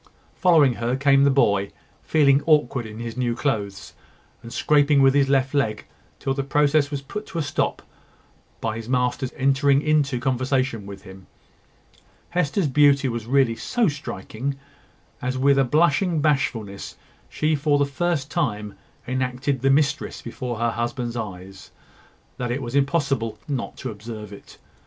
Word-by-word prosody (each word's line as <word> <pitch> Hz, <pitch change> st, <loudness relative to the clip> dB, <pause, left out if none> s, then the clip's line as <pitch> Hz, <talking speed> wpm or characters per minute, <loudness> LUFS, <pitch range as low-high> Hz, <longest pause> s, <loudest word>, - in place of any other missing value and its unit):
Following 160 Hz, -8 st, +4 dB
her 120 Hz, +2 st, -1 dB
came 140 Hz, 0 st, +4 dB
the -, -, +5 dB
boy, 100 Hz, -8 st, +2 dB, 0.3 s
feeling 140 Hz, -3 st, +3 dB
awkward 145 Hz, -6 st, +2 dB
in 110 Hz, 0 st, -10 dB
his 115 Hz, -1 st, -6 dB
new 120 Hz, -2 st, -1 dB
clothes, 105 Hz, -8 st, -3 dB, 0.5 s
and 115 Hz, -, -10 dB
scraping 145 Hz, +4 st, +3 dB
with 135 Hz, 0 st, +5 dB
his 140 Hz, -1 st, +3 dB
left 135 Hz, 0 st, +2 dB
leg 110 Hz, -7 st, 0 dB, 0.3 s
till 135 Hz, -, -2 dB
the 135 Hz, -, -2 dB
process 145 Hz, +1 st, +2 dB
was 140 Hz, -2 st, -4 dB
put 195 Hz, +6 st, -8 dB
a 165 Hz, -, 0 dB
stop 145 Hz, -, -1 dB
to -, -, -19 dB, 0.8 s
by 110 Hz, -1 st, -2 dB
his 115 Hz, +1 st, -8 dB
master's 125 Hz, 0 st, 0 dB
entering 135 Hz, 0 st, +3 dB
into 150 Hz, -4 st, +1 dB
conversation 130 Hz, -3 st, -1 dB
with 100 Hz, -1 st, -9 dB
him. 95 Hz, -1 st, -13 dB, 1.0 s
Hester's 180 Hz, +1 st, 0 dB
beauty 140 Hz, 0 st, +4 dB
was 115 Hz, -2 st, -5 dB
really 130 Hz, -3 st, +3 dB
so 235 Hz, -, 0 dB
striking, 140 Hz, -, -4 dB, 0.7 s
as 130 Hz, +1 st, -2 dB
with 140 Hz, +1 st, +3 dB
a -, -, +5 dB
blushing 160 Hz, +5 st, +2 dB
bashfulness, 135 Hz, -9 st, -1 dB, 0.3 s
she 155 Hz, +1 st, 0 dB
for 145 Hz, 0 st, +2 dB
the 145 Hz, -, +2 dB
first 145 Hz, +1 st, -2 dB
time 105 Hz, -, -2 dB, 0.3 s
enacted 130 Hz, +1 st, -1 dB
the 135 Hz, -, +2 dB
mistress 145 Hz, +1 st, +1 dB
before 125 Hz, -3 st, -5 dB
her 115 Hz, +1 st, 0 dB
husband's 120 Hz, +1 st, -3 dB
eyes, 95 Hz, -4 st, -7 dB, 0.7 s
that 125 Hz, -2 st, -3 dB
it 130 Hz, +3 st, -2 dB
was 120 Hz, 0 st, -6 dB
impossible 135 Hz, -6 st, 0 dB
not 135 Hz, -4 st, -4 dB
to 130 Hz, -, -5 dB
observe 105 Hz, -1 st, -8 dB
it. 100 Hz, -, -14 dB
135 Hz, 155 wpm, -23 LUFS, 115-145 Hz, 1.0 s, the